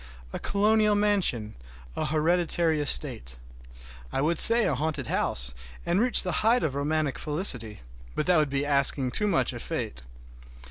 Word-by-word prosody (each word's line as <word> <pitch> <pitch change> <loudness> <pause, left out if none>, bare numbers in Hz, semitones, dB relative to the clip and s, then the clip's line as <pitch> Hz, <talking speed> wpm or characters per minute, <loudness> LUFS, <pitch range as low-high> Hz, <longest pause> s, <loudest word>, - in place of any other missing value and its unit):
A - - -4
colonial 210 +1 +1
mansion, 195 - 0 0.4
a - - -2
hereditary 160 +1 0
estate, - - 0 0.7
I - - -3
would 155 +3 0
say 230 0 +5
a - - 0
haunted 150 -3 -3
house, 65 - 0 0.3
and 175 +3 0
reach 250 +1 +5
the 185 - -3
height 235 +3 +2
of 145 - -2
romantic 145 -1 -2
felicity—but 110 - -2
that 180 -1 +3
would 150 -2 +1
be 140 +1 -2
asking 140 -2 +1
too 210 - 0
much 195 - 0
of - - -8
fate! 60 -1 -5
155 Hz, 150 wpm, -26 LUFS, 130-190 Hz, 0.7 s, say